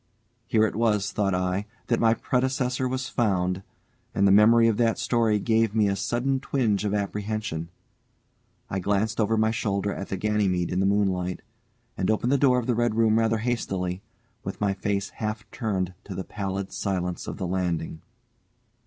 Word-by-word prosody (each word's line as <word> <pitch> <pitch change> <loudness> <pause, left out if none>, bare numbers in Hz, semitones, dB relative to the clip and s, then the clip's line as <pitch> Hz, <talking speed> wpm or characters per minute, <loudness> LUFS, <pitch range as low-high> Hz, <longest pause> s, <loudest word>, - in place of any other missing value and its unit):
Here 110 -1 +3
it 105 - -2
was, 105 -3 +1
thought 100 -2 0
I, 90 +3 -1 0.2
that 115 - +1
my 115 0 +4
predecessor 130 +1 0
was 130 +1 -2
found, 95 -5 0 0.5
and 100 - +3
the - - +5
memory 115 +3 +6
of 110 -2 +2
that 115 -2 +2
story 115 -3 +2
gave 110 0 +1
me 105 -2 +4
a 100 - +1
sudden 120 +7 0
twinge 115 -7 0
of 105 0 0
apprehension. 105 -4 -3 1.0
I 95 - -2
glanced 105 +4 0
over 110 +1 +2
my 110 0 +3
shoulder 100 -3 -1
at 100 - -6
the 95 - -2
Ganymede 100 -4 0
in 90 - 0
the 95 - +3
moonlight, 95 -3 0 0.5
and 95 - -1
opened 110 +3 +1
the 140 - +3
door 130 -2 +4
of 125 - -1
the 125 - +1
red 120 -1 +1
room 110 -1 +4
rather 115 0 +2
hastily, 95 -6 -2 0.4
with - - -5
my 100 -1 +1
face 100 0 -2
half 110 0 -4
turned 95 -7 -2
to 95 - -7
the 95 - -3
pallid 100 -1 -4
silence 90 -3 -2
of - - -5
the 95 - -3
landing. 85 -3 -2
105 Hz, 180 wpm, -26 LUFS, 95-115 Hz, 1.0 s, memory